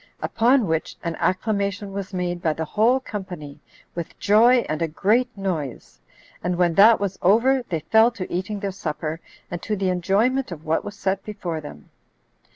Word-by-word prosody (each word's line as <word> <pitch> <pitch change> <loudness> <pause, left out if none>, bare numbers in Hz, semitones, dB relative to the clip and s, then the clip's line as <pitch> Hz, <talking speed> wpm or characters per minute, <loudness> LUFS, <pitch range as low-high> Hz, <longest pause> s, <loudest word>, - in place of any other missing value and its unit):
Upon 240 +1 +2
which 160 -2 -2
an 170 -1 -2
acclamation 200 0 -1
was 195 -1 -5
made 175 -2 -3
by 160 -3 +1
the 160 +1 -4
whole 230 - +2
company, 180 - -7 0.3
with 170 -2 -6
joy 235 +4 +5
and 155 +1 -3
a 165 - +1
great 215 +10 +1
noise; 160 - -4 0.4
and 180 +1 0
when 175 -1 +2
that 215 +6 +7
was 200 -2 -3
over, 235 +8 +4
they 165 -4 -2
fell 220 +8 +5
to 190 -5 -6
eating 190 +3 -3
their 200 -1 -2
supper, 160 -3 -4 0.3
and 175 -1 -4
to 215 - -2
the 190 -2 0
enjoyment 200 +8 +1
of 160 -2 -8
what 160 +1 0
was 205 - -7
set 195 0 -1
before 180 -7 -5
them. 75 - -11
190 Hz, 175 wpm, -23 LUFS, 165-215 Hz, 0.4 s, that